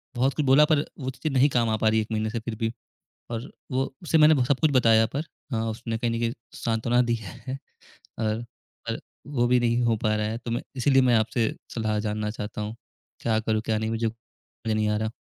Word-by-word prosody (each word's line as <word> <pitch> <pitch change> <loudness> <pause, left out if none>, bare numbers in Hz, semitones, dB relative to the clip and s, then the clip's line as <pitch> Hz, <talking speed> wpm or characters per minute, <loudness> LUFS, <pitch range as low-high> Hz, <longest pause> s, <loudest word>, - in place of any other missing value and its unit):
बहुत 130 +3 +2
कुछ 150 - 0
बोला, 135 +3 +7
पर 150 -1 +2
वो 130 -2 -3
चीज़ें 155 +4 -3
नहीं 135 +3 +5
काम 120 -4 +2
आ 110 - +2
पा 110 - +1
रहीं 110 0 +3
1 105 - -5
महीने 110 0 0
से, 115 +1 -2
फिर 110 0 -5
भी। 115 0 -1 0.6
और 115 0 -4 0.2
वो 130 +1 -1
उसे 165 -1 +3
मैंने 155 0 +7
भ 130 - +2
सब 135 +1 +1
कुछ 155 -2 +4
बताया 115 -4 +5
पर 145 - 0 0.3
हाँ, 115 0 0
उसने 115 +1 -4
कहीं 120 0 0
न 115 - -1
कहीं 115 0 0 0.2
सांत्वना 120 +2 +1
दी 120 -1 +1
है 130 +7 -7 0.6
और 110 +1 -1 0.5
और - - -3 0.3
वो 130 -4 +1
भी 125 0 +4
नहीं 120 0 +2
हो 115 -1 +3
पा 110 0 +2
रहा 105 0 0
है, 110 +2 -3
तो 120 0 -6
मैं 115 - -1
इसलिए 135 +1 +4
मैं 125 -2 +4
आपसे 110 +1 +1 0.2
सलाह 110 -2 0
जानना 105 0 -2
चाहता 105 0 -5
हूँ, 105 +2 -4 0.4
क्या 110 -2 +1
करूँ? 110 0 0
क्या 110 -1 +1
नहीं? 110 0 -2
मुझे 115 0 0
समझ 115 0 -7
नहीं 110 0 +1
आ 105 - +1
रहा। 110 0 -1
115 Hz, 235 wpm, -26 LUFS, 110-125 Hz, 0.6 s, बोला